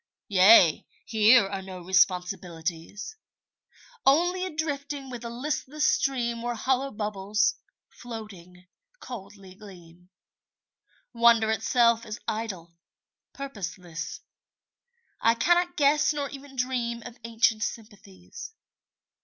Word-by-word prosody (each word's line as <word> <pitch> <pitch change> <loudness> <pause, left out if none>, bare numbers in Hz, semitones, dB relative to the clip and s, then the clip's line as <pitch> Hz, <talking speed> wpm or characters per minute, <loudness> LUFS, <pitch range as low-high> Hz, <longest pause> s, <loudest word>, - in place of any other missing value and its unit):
Yea, 190 -4 +6 0.2
here 220 -1 +5
are 195 -1 -5
no 190 -1 -9
responsibilities. 180 - -1 0.9
Only 355 +6 +3
a - - -5
drifting 285 -3 -4
with 245 -2 -7
the 235 - -6
listless 290 +4 -2
stream 235 -6 0
Where 240 0 -3
hollow 265 +4 0
bubbles, 210 -1 0 0.4
floating, 195 -7 -10 0.3
coldly 195 -5 -10
gleam. 180 -3 -15 1.0
Wonder 230 -2 +4
itself 230 +1 +2
is 215 +1 -6
idle, 190 -7 -4 0.6
purposeless; 185 -10 -6 1.0
I 230 0 +4
cannot 350 +7 +2
guess 300 +1 +4
Nor 285 -1 -3
even 275 -1 -11
dream 245 -2 -2
of 245 -1 -10
ancient 225 -1 +1
sympathies. 210 - -8
230 Hz, 100 wpm, -27 LUFS, 195-270 Hz, 1.0 s, Yea